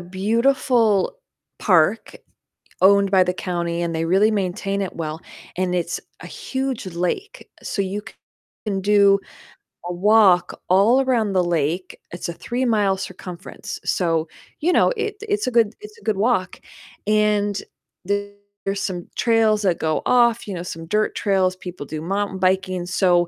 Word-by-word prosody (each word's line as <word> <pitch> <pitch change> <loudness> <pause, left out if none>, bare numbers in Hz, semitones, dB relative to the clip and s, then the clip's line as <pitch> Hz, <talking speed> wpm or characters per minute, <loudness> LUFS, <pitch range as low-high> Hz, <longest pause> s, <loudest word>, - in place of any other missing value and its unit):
beautiful 225 - +1 0.4
park 185 +2 +2 0.7
owned 200 0 +5
by 190 -2 +5
the 180 0 -1
county, 170 -2 -3
and 170 -1 -2
they 165 0 -1
really 195 +5 +3
maintain 195 0 -1
it 190 - -4
well, 160 -1 -5 0.4
and 180 -1 0
it's 170 -1 -2 0.2
a - - -8
huge 265 - -4
lake, 180 - -3
so 200 - -2
you 195 +2 -3 0.6
can 195 -2 -1
do 200 0 +5 0.7
a 175 - -3
walk 190 -2 +4
all 215 +8 +5
around 230 -6 +1
the 185 - +3
lake, 175 +1 -1
it's 175 0 -5
a 170 - -3
three-mile 220 -4 0
circumference, 180 -1 -8
so 165 -3 0 0.3
you 340 +4 +2
know, - - +4
it 425 -1 -3
it's 415 0 0
a 255 - 0
good 230 -2 +3
it's 425 +1 -11
a - - -21
good 215 -3 0
walk, 200 -4 0 0.5
and 210 -1 +2 0.4
there's 205 0 -4
some 180 -3 -4
trails 225 -2 +3
that 180 -3 +2
go 155 -1 0
off, 235 -2 +3
you 200 - -4
know, 175 -1 -5
some 165 -2 -7
dirt 215 +4 +1
trails, 190 -2 +1
people 180 -5 -8
do 155 +1 -6
mountain 195 +2 -2
biking, 185 -1 0
so 175 -1 +2
195 Hz, 150 wpm, -22 LUFS, 180-215 Hz, 0.7 s, owned